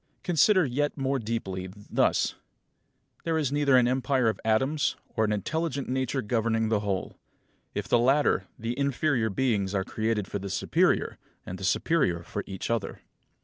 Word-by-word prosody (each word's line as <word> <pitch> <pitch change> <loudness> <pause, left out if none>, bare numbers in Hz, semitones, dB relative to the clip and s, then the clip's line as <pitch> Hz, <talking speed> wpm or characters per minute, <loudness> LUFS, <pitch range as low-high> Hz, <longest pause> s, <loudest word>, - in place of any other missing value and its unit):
Consider 180 +2 +4
yet 145 +4 -1
more 135 0 0
deeply, 100 -5 -3
thus: 105 0 +1 0.9
There 165 -1 0
is 145 -3 0
either 145 -2 +4
an 125 -1 +4
empire 130 -1 +2
of 110 - -3
atoms, 130 +7 +1 0.2
or 110 - +2
an 105 - -1
intelligent 140 - -2
Nature 130 0 -1
governing 115 0 0
the 110 -2 +2
whole. 100 -2 -3 0.6
If - - -3
the 120 - +4
latter, 130 -6 +3
the 115 +2 -3
inferior 140 -4 +1
beings 100 -3 0
are 95 - +1
created 110 -1 -1
for 100 - -4
the 100 0 -6
superior, 95 - +1 0.3
and 95 - -6
the - - -8
superior 90 - +1
for 100 +4 -5
each 95 +3 -4
other. 115 -4 -2
115 Hz, 160 wpm, -27 LUFS, 105-140 Hz, 0.9 s, Consider